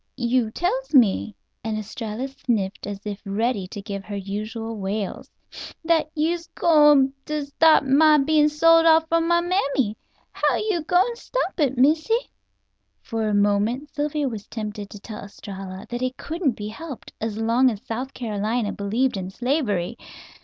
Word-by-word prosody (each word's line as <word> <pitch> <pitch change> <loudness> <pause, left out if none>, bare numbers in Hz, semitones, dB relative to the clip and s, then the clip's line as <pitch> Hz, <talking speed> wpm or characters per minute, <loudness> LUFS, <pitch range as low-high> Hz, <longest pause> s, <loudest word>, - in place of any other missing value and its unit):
"You 240 -2 +1
tells 400 - -2
me," 220 -4 +4 0.3
and 220 -1 -2
Estralla 215 +3 -5
sniffed 225 -9 -2
as 205 0 -7
if 205 -1 -5
ready 205 0 -1
to 200 +2 -8
give 200 -1 -5
her 205 - -6
usual 215 +3 -5
wails, 195 +1 -4 0.6
"that 320 -2 +2
you'se 335 +2 -1
gwine 295 -5 +5
to 300 -1 -2
stop 310 +3 +4
my 300 +3 +5
bein' 300 +1 +3
sold 330 +2 +5
off 320 0 +5
from 330 0 +2
my 345 0 +3
mammy. 280 - 0 0.4
How - - +1
you 420 -6 0
gwine 360 +8 +2
to 470 - -14
stop - - -3
it, 275 -4 +1
Missy?" 315 - +2 0.7
For 225 -2 -2
a 210 - +1
moment 205 +8 +1
Sylvia 295 0 -1
was 220 -5 -6
tempted 210 -2 -6
to 205 - -10
tell 215 +1 -8
Estralla 195 -2 -8
that 240 +1 -3
it 255 0 -2
couldn't 320 -5 -1
be 210 -1 -6
helped, 280 +4 -9
as 220 -1 -3
long 230 +4 +3
as 215 -4 -6
South 255 +4 -5
Carolina 215 -1 -1
believed 220 +4 0
in 185 -1 -4
slavery. 235 - -1
245 Hz, 160 wpm, -23 LUFS, 210-305 Hz, 0.7 s, gwine